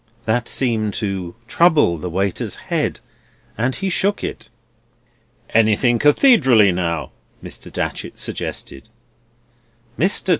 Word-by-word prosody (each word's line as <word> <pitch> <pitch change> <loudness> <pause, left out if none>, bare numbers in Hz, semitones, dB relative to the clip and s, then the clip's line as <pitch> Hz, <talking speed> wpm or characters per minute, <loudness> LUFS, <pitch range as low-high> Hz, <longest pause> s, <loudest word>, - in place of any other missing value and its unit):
That 115 +1 0
seemed 110 -5 0
to 95 -4 -3
trouble 150 - +3
the 90 - -4
waiter's 95 +2 -2
head, - - -2 0.6
and 125 +4 -1
he 195 -1 -2
shook 200 +3 0
it. - - -6 1.0
"Anything 115 +2 +3
Cathedraly, 145 - +5
now," 85 -6 -2 0.3
Mr. - - -8
Datchery - - -4
suggested. 70 - -5 1.1
"Mr. 190 +2 +1
110 Hz, 105 wpm, -20 LUFS, 95-145 Hz, 1.1 s, Cathedraly